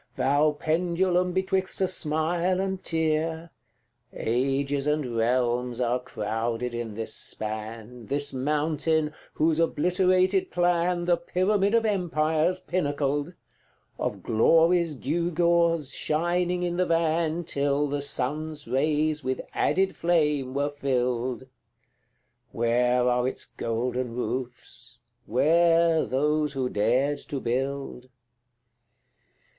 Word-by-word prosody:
Thou 145 +3 +2
pendulum 175 +3 +1
betwixt 190 +1 -1
a 190 - +2
smile 170 +2 0
and 190 -1 -2
tear, 160 0 -1 0.6
Ages 135 +4 -1
and 150 -1 +1
realms 120 +1 0
are 125 0 +1
crowded 115 +1 -3
in 120 -2 -4
this 110 +1 -3
span, 110 +2 -3
This 145 +1 -1
mountain, 150 +3 0 0.2
whose 160 +1 +2
obliterated 185 +3 +2
plan 175 0 +1
The 175 0 +3
pyramid 195 +4 +1
of 230 -1 +3
empires 170 -3 +1
pinnacled, 145 -2 -1 0.6
Of - - -3
Glory's 165 +7 +3
gewgaws 170 0 +1
shining 175 +3 0
in 175 0 -2
the 185 0 +1
van 165 0 +1
Till 145 -2 0
the 145 0 -2
sun's 150 +2 -4
rays 150 +4 0
with 130 0 -2
added 190 +1 +1
flame 150 -6 +1
were 145 +1 0
filled! 125 -3 -1 1.1
Where 125 +2 +2
are 125 0 +2
its 130 - -3
golden 120 +1 -3
roofs? 125 0 -5 0.3
where 165 +5 +3
those 150 +2 0
who 130 -2 -1
dared 125 +8 +1
to 140 - -3
build? 130 +1 -3
150 Hz, 105 wpm, -26 LUFS, 125-170 Hz, 1.1 s, The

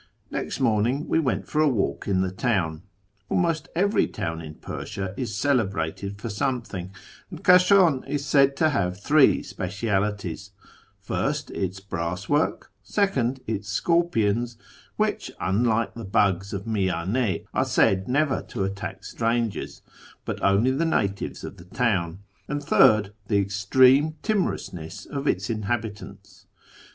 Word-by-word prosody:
Next - - -3
morning 120 +3 +1
we - - +2
went 140 -6 -1
for 155 - +1
a 155 - +4
walk 95 - -1
in 95 -2 +2
tlie 95 0 -2
town. 95 -10 0 0.5
Almost 165 -3 0
I 175 - +1
every 205 +2 +3
town 85 -5 -4
in 75 -1 -9
Persia 95 +3 -6
is 115 -3 -4
celebrated 100 - -1
for 110 - -5
something, 110 -5 -3 0.4
and - - -10
Kashan 180 -5 +5
is 145 -1 -2
said 140 -1 +4
to 155 - +3
have 90 -8 -1
three 145 +6 +4
specialties: 100 0 -3 0.5
first, - - -2
its 95 0 -3
brass 90 0 -4
work; 145 +2 0
second, 135 - 0
its 105 -2 -4
scorpions 120 -5 +1 0.4
(which, - - -1
unlike 110 +3 +1
the 115 - -8
bugs 95 -1 +1
of 100 0 -4
Miyane, 100 +1 0
are - - +2
said 95 0 +2
never 140 +2 +1
to 105 - -3
attack 100 +1 -5
strangers, 115 -1 -2 0.4
but - - -4
only 100 +6 +4
the 140 +5 0
natives 100 -12 -1
of - - -7
the 85 - -13
town); 95 -4 -1 0.2
and 145 0 -3
third, 110 -8 +4
the 105 - +2
extreme 130 +10 +4
timorousness 100 - -2
of 140 0 -4
its 95 +4 0
inhabitants. 110 -1 -5
110 Hz, 140 wpm, -25 LUFS, 95-135 Hz, 0.5 s, Kashan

